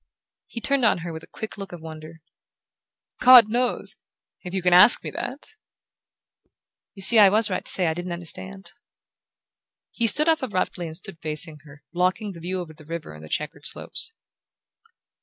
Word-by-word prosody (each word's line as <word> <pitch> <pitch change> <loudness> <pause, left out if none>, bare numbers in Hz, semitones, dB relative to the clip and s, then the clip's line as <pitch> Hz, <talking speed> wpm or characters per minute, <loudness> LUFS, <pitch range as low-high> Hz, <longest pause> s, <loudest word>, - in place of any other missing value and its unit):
He 235 - -7
turned 275 0 0
on 225 - +3
her 170 - -6
with 160 - -8
a - - -16
quick 220 -1 -9
look 195 -2 -8
of 175 - -9
wonder. 160 0 -11 1.0
"God 250 -3 +8
knows 245 +2 -1 0.4
if 180 - -8
you 190 -1 -4
can 180 -1 +3
ask 195 +7 +8
me - - -6
that!" 275 - -6 1.5
"You 195 - -6
see 225 +3 +7
I 205 -2 +8
was 215 +1 +2
right - - -3
to - - -2
say 185 - 0
I 160 - 0
didn't 175 +2 -6
understand." 190 +3 -7 1.2
He 235 - 0
stood 300 +8 +4
up 320 -1 +2
abruptly 185 -6 -3
and 160 0 -7
stood 195 -4 -11
facing 155 0 -2
her, 145 0 -16
blocking 185 +4 -1
the 170 - -12
view 185 +3 -4
over 160 -3 -10
the 155 0 -16
river 165 - -8
and 75 0 -13
the 80 - -12
checkered 150 - -4
slopes. 450 - -3
180 Hz, 180 wpm, -23 LUFS, 160-215 Hz, 1.5 s, God